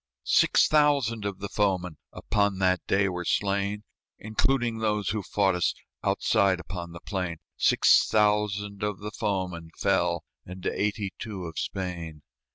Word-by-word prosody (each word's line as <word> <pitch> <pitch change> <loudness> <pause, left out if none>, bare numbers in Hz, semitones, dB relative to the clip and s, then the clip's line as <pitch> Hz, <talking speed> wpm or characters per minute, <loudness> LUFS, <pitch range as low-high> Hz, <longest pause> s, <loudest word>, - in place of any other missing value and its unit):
Six - - +4
thousand 140 -8 +2
of 100 -2 -3
the 100 - -5
foemen 95 -5 0
Upon 100 -1 0
that 95 -1 +2
day 100 +1 +3
were 90 -1 -3
slain, 100 +2 0 0.3
Including 115 +2 0
those 105 -2 0
who 105 0 -1
fought 95 0 +1
us 90 -1 0 0.3
Outside 95 -2 +2
upon 90 -2 -7
the 85 - -9
plain 90 -3 -3 0.2
Six - - +4
thousand 105 -1 +1
of 105 -1 -1
the 105 +1 -7
foemen 95 -7 -3
fell, 85 -2 +1 0.2
And 90 0 -10
eighty 105 -1 -1
two 100 -6 -6
of 80 -2 -5
Spain. 85 -6 -5
100 Hz, 145 wpm, -27 LUFS, 90-105 Hz, 0.3 s, Six